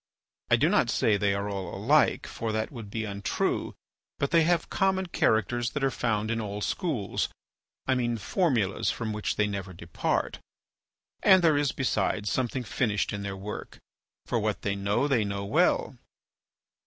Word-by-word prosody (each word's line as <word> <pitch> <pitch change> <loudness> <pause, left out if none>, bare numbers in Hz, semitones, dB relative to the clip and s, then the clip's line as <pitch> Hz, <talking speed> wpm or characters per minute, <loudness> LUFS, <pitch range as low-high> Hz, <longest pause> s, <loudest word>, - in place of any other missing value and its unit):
I - - +6
do - - +3
not - - +3
say 110 - +3
the 100 -1 +1
are 100 +1 -2
all 95 -3 -4
alike, - - +3
for 115 -1 -4
that 110 0 -2
would 115 -6 -8
be 110 +1 -3
untrue, 100 -1 -2 0.4
but 140 - -1
they 165 0 +5
have 170 -1 +2
common 190 -1 +1
characters 120 - +1
that 140 - -2
are 135 - +3
found 110 -3 -1
in 115 0 -1
all 105 -1 -4
schools—I 130 - -3
mean 120 -2 0
formulas 115 - +1
from 110 -2 -2
which 105 0 -2
they 105 - +2
never 100 -2 -4
depart—and 85 - -1
there 160 -3 +5
is 145 -1 +2
besides 105 -5 0
something 130 0 -1
finished 105 -1 0
in 100 - -3
their 100 -1 -4
work, 100 +2 -7 0.5
for - - 0
what - - -2
they 100 -1 0
know 100 +7 +1
they 125 -6 +2
know 100 -1 -3
well. - - +1
110 Hz, 165 wpm, -28 LUFS, 100-130 Hz, 0.5 s, I